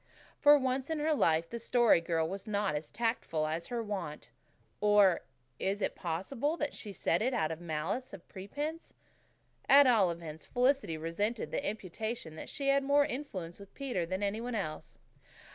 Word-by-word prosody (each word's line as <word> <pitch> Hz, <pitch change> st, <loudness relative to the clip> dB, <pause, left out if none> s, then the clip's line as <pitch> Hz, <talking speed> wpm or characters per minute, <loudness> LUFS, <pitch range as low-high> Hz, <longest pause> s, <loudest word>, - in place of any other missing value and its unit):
For 295 Hz, 0 st, +8 dB
once 260 Hz, 0 st, -1 dB
in 320 Hz, -, -1 dB
her 305 Hz, +1 st, +1 dB
life 165 Hz, -, +2 dB
the 235 Hz, -, -4 dB
Story 235 Hz, -5 st, +4 dB
Girl 165 Hz, -1 st, 0 dB
was 195 Hz, +4 st, -6 dB
not 205 Hz, -4 st, 0 dB
as 150 Hz, +1 st, -4 dB
tactful 225 Hz, -9 st, -1 dB
as 160 Hz, +2 st, -3 dB
her 240 Hz, -2 st, -2 dB
wont. 150 Hz, -, -5 dB, 0.5 s
Or 205 Hz, -3 st, +5 dB, 0.4 s
is 195 Hz, +1 st, -1 dB
it -, -, -1 dB
possible 230 Hz, -, -2 dB
that 295 Hz, -, -2 dB
she 210 Hz, -, -7 dB
said 170 Hz, -1 st, 0 dB
it 250 Hz, +3 st, +1 dB
out 160 Hz, -8 st, +1 dB
of 160 Hz, +1 st, -6 dB
malice 175 Hz, +10 st, -3 dB, 0.2 s
prepense? 290 Hz, -, -6 dB, 0.7 s
At 280 Hz, +1 st, +9 dB
all 220 Hz, -8 st, +5 dB
events, 165 Hz, -2 st, -6 dB
Felicity 250 Hz, -, +1 dB
resented 205 Hz, +8 st, -2 dB
the -, -, -2 dB
imputation 215 Hz, -2 st, -4 dB
that -, -, -8 dB
she 275 Hz, -1 st, -2 dB
had 275 Hz, 0 st, +4 dB
more 285 Hz, +1 st, +4 dB
influence 205 Hz, -, -5 dB
with 200 Hz, -1 st, -14 dB
Peter 255 Hz, -10 st, -2 dB
than 185 Hz, +3 st, -2 dB
any 205 Hz, +2 st, -1 dB
one 245 Hz, 0 st, -3 dB
else. 155 Hz, -8 st, -5 dB
205 Hz, 175 wpm, -32 LUFS, 170-255 Hz, 0.7 s, At